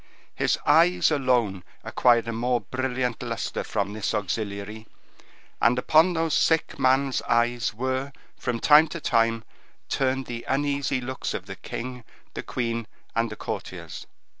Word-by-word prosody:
His - - +1
eyes 170 +3 +4
alone 125 -10 +1 0.2
acquired 120 -2 +3
a - - -1
more 120 +2 0
brilliant 125 -2 -2
luster - - -3
from 100 -1 -2
this 110 +1 -2
auxiliary, 105 +1 -4 0.7
and 120 +2 +4
upon 160 +7 +4
those 165 -2 0
sick 160 -3 +2
man's 135 0 +2
eyes 120 0 +2
were, 130 +4 -2 0.2
from 120 -1 -3
time 155 +3 +7
to 170 +2 -6
time, 115 -4 +1 0.5
turned 135 0 0
the 120 -1 -6
uneasy 140 -1 0
looks 130 +1 -4
of - - -5
the - - -7
king, 125 0 -6 0.3
the - - -4
queen, 115 -2 -3 0.3
and 115 0 +1
the 110 - -7
courtiers. - - -6
125 Hz, 140 wpm, -25 LUFS, 115-140 Hz, 0.7 s, time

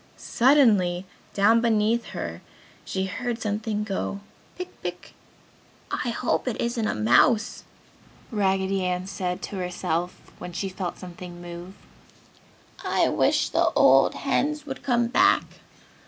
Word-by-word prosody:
Suddenly 215 -9 +3 0.3
down 220 +3 +5
beneath 230 0 +2
her - - -6 0.4
she 190 0 -2
heard 240 +4 -3
something 210 0 -2
go, 200 -1 -3 0.4
"Pick, 365 0 -8
pick!" - - -6 0.8
"I 245 - -1
hope 235 +2 -1
it 240 - -2
isn't 235 -2 -1
a - - -1
mouse!" 130 - +3 0.7
Raggedy 195 -2 +1
Ann 180 0 -1
said 185 -2 -4
to 200 - -5
herself, 180 -1 -2 0.2
when 180 0 -7
she 195 +2 -3
felt 185 -1 -5
something 175 -1 -9
move. 175 +2 -9 1.1
"I - - +2
wish - - +2
the - - +2
old - - +5
hens 300 0 -1
would 265 -3 -6
come 240 -2 +2
back." 235 - +4
200 Hz, 125 wpm, -25 LUFS, 180-235 Hz, 1.1 s, down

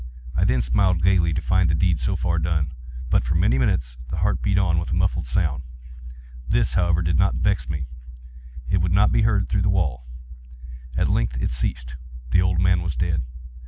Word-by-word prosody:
I - - +2
then 60 0 +2
smiled 85 +7 +1
gaily, 90 -3 +3
to 80 -1 -2
find 95 -2 +2
the 80 - +2
deed 85 -1 +1
so 65 - -1
far 85 -1 0
done. 80 -3 -1 0.4
But, - - +3
for - - -1
many 65 +2 +2
minutes, 60 -1 -1
the 80 - -4
heart 100 +5 0
beat 100 -1 +1
on 85 -4 +2
with 85 - -5
a 80 - -1
muffled 90 -6 0
sound. 70 -1 -1 0.9
This, - - +1
however, 90 -2 +1
did 80 -1 0
not - - +2
vex - - 0
me; 75 -3 -3 0.8
it 95 - +1
would 90 0 0
not 100 +2 +4
be - - +2
heard 105 -3 +2
through 100 - 0
the 100 - +1
wall. 70 -11 -1 0.9
At - - +2
length - - 0
it - - -1
ceased. 60 0 -4 0.3
The 90 - +4
old 90 -2 +1
man 90 -1 +3
was 85 -4 -3
dead. 85 -3 0
85 Hz, 200 wpm, -23 LUFS, 65-90 Hz, 0.9 s, not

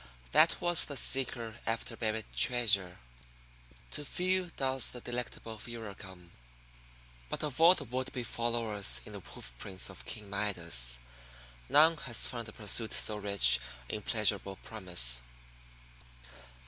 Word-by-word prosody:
That - - +5
was 175 -1 +4
the 145 - -6
Seeker 120 -5 0
after 115 +1 -2
Buried 110 -1 -2
Treasure. 100 -7 +2 0.9
To 150 - -4
few 185 +4 0
does 130 -2 +1
the 125 - -7
delectable 120 -2 -5
furor 115 -2 -6
come. 90 -2 -12 1.0
But - - -3
of 150 0 -3
all 175 +3 +8
the 145 - -3
would 130 +1 -4
be 125 - -4
followers 115 - 0
in - - -10
the - - -6
hoof - - -8
prints 95 0 -4
of 95 - -12
King 105 -2 -6
Midas 85 -12 0 0.7
none 160 +2 +6
has 120 -5 +2
found 120 -2 -5
a - - -5
pursuit 110 +1 0
so 105 - +1
rich 100 -12 +4 0.3
in 105 - -4
pleasurable 105 -2 0
promise. 85 - +3
110 Hz, 135 wpm, -32 LUFS, 100-125 Hz, 1.0 s, all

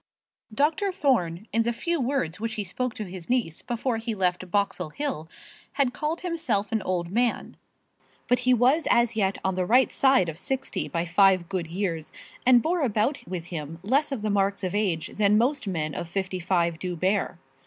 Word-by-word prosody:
Dr. 320 - +1
Thorne, 225 - 0
in 230 - +3
the 235 +1 +1
few 335 +7 -2
words 235 - -1
which 225 0 -3
he 210 - -2
spoke 240 +6 -3
to 215 - -4
his 180 -3 -9
niece 240 -11 0
before 245 0 -2
he 225 0 -3
left 180 -1 0
Boxall 195 -3 0
Hill, 165 - -4 0.4
had 270 -3 +1
called 305 +5 -2
himself 315 - -1
an 220 -1 0
old 175 -2 -2
man; 240 +3 0 0.7
but 245 0 +3
he 250 0 +2
was 255 +6 +3
as 235 -1 +3
yet 195 -2 +1
on 190 - +2
the 185 0 0
right 245 +8 +4
side 265 -9 +4
of 165 0 -5
sixty 265 +6 -3
by 170 0 -2
five 185 0 +4
good 185 -4 -2
years, 170 -3 -3 0.4
and 245 -2 +7
bore 345 +2 +1
about 250 +2 +1
with 175 -2 -5
him 155 0 -5
less 275 +8 +2
of 245 -6 -3
the 215 - 0
marks 200 0 +1
of 185 - -2
age 190 -7 0
than 210 0 +4
most 250 +1 +1
men 155 -5 -2
of 170 - -5
fifty 185 0 -2
five 170 -2 0
do 180 0 -3
bear. 190 +5 0
210 Hz, 195 wpm, -26 LUFS, 180-250 Hz, 0.7 s, and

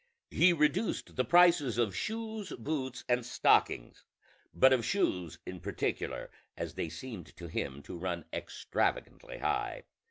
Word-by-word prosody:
He 175 +2 +6
reduced 150 +5 +1
the 125 - +2
prices 170 -4 +5
of 110 -6 +1
shoes, 220 - -4
boots, 130 -1 -3
and 125 0 +2
stockings, 85 - +2 0.5
but 130 0 +6
of 125 -3 +2
shoes 90 - 0
in - - -6
particular, - - -3 0.3
as - - -4
they 80 - -3
seemed 110 -6 -8
to 85 - -8
him 70 -3 -4
to 85 - -8
run 85 -2 -3
extravagantly - - -2
high. - - -1
125 Hz, 135 wpm, -32 LUFS, -, 0.5 s, He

